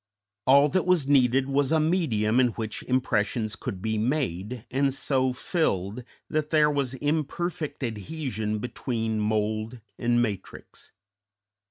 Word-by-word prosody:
All 140 Hz, +2 st, +7 dB
that 185 Hz, +3 st, 0 dB
was 175 Hz, -7 st, +3 dB
needed 135 Hz, -1 st, +4 dB
was 140 Hz, 0 st, +1 dB
a 160 Hz, -, +4 dB
medium 130 Hz, -, +2 dB
in 130 Hz, -, +5 dB
which 110 Hz, -1 st, -5 dB
impressions 115 Hz, -3 st, 0 dB
could 95 Hz, -5 st, -6 dB
be 110 Hz, -1 st, 0 dB
made 115 Hz, -, -2 dB
and 135 Hz, +2 st, +2 dB
so 130 Hz, -1 st, 0 dB
filled 125 Hz, -, -1 dB, 0.2 s
that 155 Hz, -1 st, -1 dB
there 150 Hz, -2 st, +4 dB
was 140 Hz, -3 st, -1 dB
imperfect 150 Hz, +1 st, -2 dB
adhesion 110 Hz, -2 st, -3 dB
between 115 Hz, -1 st, -2 dB
mould 110 Hz, +2 st, -1 dB, 0.2 s
and 120 Hz, 0 st, +2 dB
matrix. 105 Hz, -5 st, -5 dB
125 Hz, 130 wpm, -26 LUFS, 110-145 Hz, 0.2 s, All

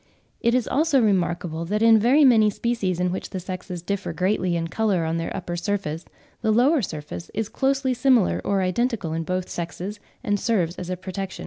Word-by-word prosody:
It 235 Hz, +1 st, +2 dB
is 250 Hz, -3 st, +1 dB
also 300 Hz, -1 st, +2 dB
remarkable 175 Hz, -6 st, 0 dB
that 210 Hz, +5 st, 0 dB
in 225 Hz, -1 st, +7 dB
very 265 Hz, +7 st, +5 dB
many 220 Hz, -5 st, +6 dB
species 205 Hz, -5 st, -1 dB
in 180 Hz, 0 st, +1 dB
which 185 Hz, -, -4 dB
the 190 Hz, -, -4 dB
sexes 180 Hz, -1 st, -6 dB
differ 200 Hz, +1 st, -3 dB
greatly 185 Hz, -2 st, 0 dB
in 165 Hz, -1 st, -1 dB
colour 195 Hz, -2 st, 0 dB
on 160 Hz, +1 st, -1 dB
their 165 Hz, -, -2 dB
upper 175 Hz, -2 st, -4 dB
surface, 175 Hz, -3 st, -3 dB, 0.4 s
the 220 Hz, -, 0 dB
lower 255 Hz, +7 st, +4 dB
surface 155 Hz, -3 st, -6 dB
is 220 Hz, 0 st, -2 dB
closely 270 Hz, -1 st, 0 dB
similar 250 Hz, -5 st, +3 dB
or 195 Hz, -1 st, +1 dB
identical 195 Hz, -2 st, -1 dB
in 165 Hz, -, -1 dB
both 185 Hz, +2 st, -2 dB
sexes, 180 Hz, +4 st, -5 dB, 0.2 s
and 205 Hz, -4 st, 0 dB
serves 185 Hz, -7 st, 0 dB
as 180 Hz, -, -6 dB
a 185 Hz, -, -2 dB
protection. 190 Hz, +1 st, -6 dB
195 Hz, 195 wpm, -24 LUFS, 175-230 Hz, 0.4 s, in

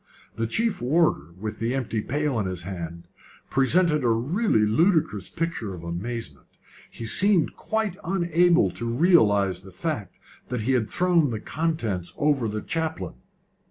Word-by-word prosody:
The 115 Hz, 0 st, -1 dB
chief 225 Hz, -, 0 dB
warder, 130 Hz, -, +1 dB
with 110 Hz, +1 st, -5 dB
the 115 Hz, +3 st, -1 dB
empty 115 Hz, -4 st, -2 dB
pail 145 Hz, 0 st, -1 dB
in 100 Hz, -, -1 dB
his 90 Hz, -2 st, -4 dB
hand, 85 Hz, -2 st, -6 dB, 0.4 s
presented 150 Hz, +3 st, +3 dB
a -, -, +2 dB
really 125 Hz, -, +2 dB
ludicrous 110 Hz, -, +2 dB
picture 160 Hz, -, -3 dB
of 85 Hz, -, -10 dB
amazement. 110 Hz, +8 st, -5 dB, 0.4 s
He 115 Hz, -, -8 dB
seemed 185 Hz, -, +3 dB
quite 215 Hz, -4 st, -2 dB
unable 175 Hz, -1 st, +3 dB
to 120 Hz, -, -6 dB
realise 105 Hz, -, +3 dB
the 95 Hz, 0 st, -13 dB
fact 100 Hz, -, -4 dB, 0.3 s
that 125 Hz, -2 st, -2 dB
he 120 Hz, +5 st, 0 dB
had 120 Hz, -4 st, +1 dB
thrown 175 Hz, -5 st, +2 dB
the 110 Hz, -3 st, -3 dB
contents 120 Hz, -, -2 dB
over 145 Hz, -5 st, +2 dB
the 110 Hz, 0 st, -4 dB
chaplain. 160 Hz, -, -3 dB
125 Hz, 150 wpm, -25 LUFS, 105-165 Hz, 0.4 s, presented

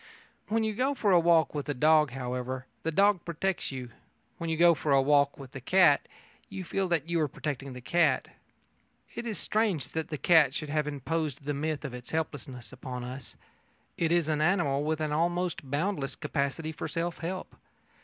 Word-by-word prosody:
When 225 Hz, +1 st, +1 dB
you 220 Hz, 0 st, 0 dB
go 260 Hz, +6 st, 0 dB
for 210 Hz, -6 st, +1 dB
a 180 Hz, -, +7 dB
walk 165 Hz, -1 st, +4 dB
with 145 Hz, -1 st, -4 dB
a 145 Hz, -, -1 dB
dog, 155 Hz, +2 st, +5 dB
however, 125 Hz, 0 st, -4 dB, 0.2 s
the 165 Hz, -, -1 dB
dog 200 Hz, +2 st, +3 dB
protects 175 Hz, +2 st, -2 dB
you: 125 Hz, -3 st, -6 dB, 0.5 s
when 170 Hz, -, -3 dB
you 160 Hz, -, 0 dB
go 170 Hz, +1 st, +7 dB
for 150 Hz, -2 st, -2 dB
a 135 Hz, -, +6 dB
walk 140 Hz, 0 st, +3 dB
with 135 Hz, -2 st, -11 dB
a 135 Hz, -, -6 dB
cat, 175 Hz, 0 st, +4 dB, 0.4 s
you 190 Hz, -, -6 dB
feel 190 Hz, +2 st, -1 dB
that 165 Hz, -3 st, 0 dB
you 170 Hz, 0 st, 0 dB
are 150 Hz, -, +2 dB
protecting 140 Hz, -1 st, -5 dB
the 125 Hz, -, -9 dB
cat. 170 Hz, +6 st, +2 dB, 0.9 s
It 235 Hz, -, -5 dB
is 220 Hz, -, -3 dB
strange 210 Hz, -8 st, 0 dB
that 160 Hz, -1 st, -3 dB
the 155 Hz, -, -4 dB
cat 150 Hz, -4 st, +5 dB
should 155 Hz, -3 st, -4 dB
have 150 Hz, 0 st, 0 dB
imposed 150 Hz, 0 st, -3 dB
the 145 Hz, -, -1 dB
myth 150 Hz, +1 st, -2 dB
of 135 Hz, -, -5 dB
its 125 Hz, -1 st, -8 dB
helplessness 135 Hz, -6 st, -4 dB
on 125 Hz, -1 st, -5 dB
us. 130 Hz, +2 st, -8 dB, 0.6 s
It 165 Hz, -1 st, 0 dB
is 170 Hz, -2 st, +3 dB
an 155 Hz, -1 st, 0 dB
animal 155 Hz, -5 st, +2 dB
with 155 Hz, +1 st, -1 dB
an 155 Hz, -1 st, -1 dB
almost 170 Hz, -2 st, -1 dB
boundless 145 Hz, -2 st, -1 dB
capacity 140 Hz, +3 st, -2 dB
for 155 Hz, -, -5 dB
self 170 Hz, +1 st, -3 dB
help. 185 Hz, +3 st, -5 dB
155 Hz, 195 wpm, -29 LUFS, 140-170 Hz, 0.9 s, a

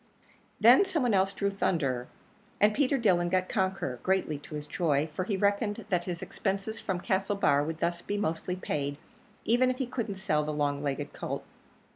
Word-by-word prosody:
Then 240 Hz, -, +8 dB
some 365 Hz, -7 st, -1 dB
one 240 Hz, -3 st, +2 dB
else 195 Hz, 0 st, +3 dB
drew 200 Hz, 0 st, -1 dB
Thunderer; 135 Hz, -10 st, 0 dB, 0.5 s
and 210 Hz, +1 st, +5 dB
Peter 275 Hz, +2 st, +2 dB
Dillon 180 Hz, -7 st, +2 dB
got 185 Hz, 0 st, +1 dB
Conqueror, 190 Hz, -, -1 dB
greatly 185 Hz, -6 st, 0 dB
to 150 Hz, -, -9 dB
his 150 Hz, 0 st, -5 dB
joy, 150 Hz, -2 st, +1 dB
for 185 Hz, +4 st, -2 dB
he 200 Hz, -1 st, -1 dB
reckoned 205 Hz, +1 st, 0 dB
that 180 Hz, -3 st, +1 dB
his 175 Hz, -2 st, -4 dB
expenses 200 Hz, +2 st, -3 dB
from 190 Hz, -3 st, -2 dB
Castlebar 190 Hz, -8 st, +2 dB
would 160 Hz, +1 st, -5 dB
thus 170 Hz, 0 st, 0 dB
be 205 Hz, -, -3 dB
mostly 180 Hz, -2 st, -1 dB
paid, 145 Hz, -5 st, -3 dB, 0.5 s
even 245 Hz, +3 st, +4 dB
if 255 Hz, -, -1 dB
he 265 Hz, -, -1 dB
couldn't 235 Hz, -5 st, -3 dB
sell 190 Hz, -6 st, 0 dB
the 150 Hz, -, -2 dB
long 145 Hz, -1 st, 0 dB
legged 140 Hz, -2 st, -3 dB
colt. -, -, -4 dB
190 Hz, 185 wpm, -29 LUFS, 155-205 Hz, 0.5 s, Then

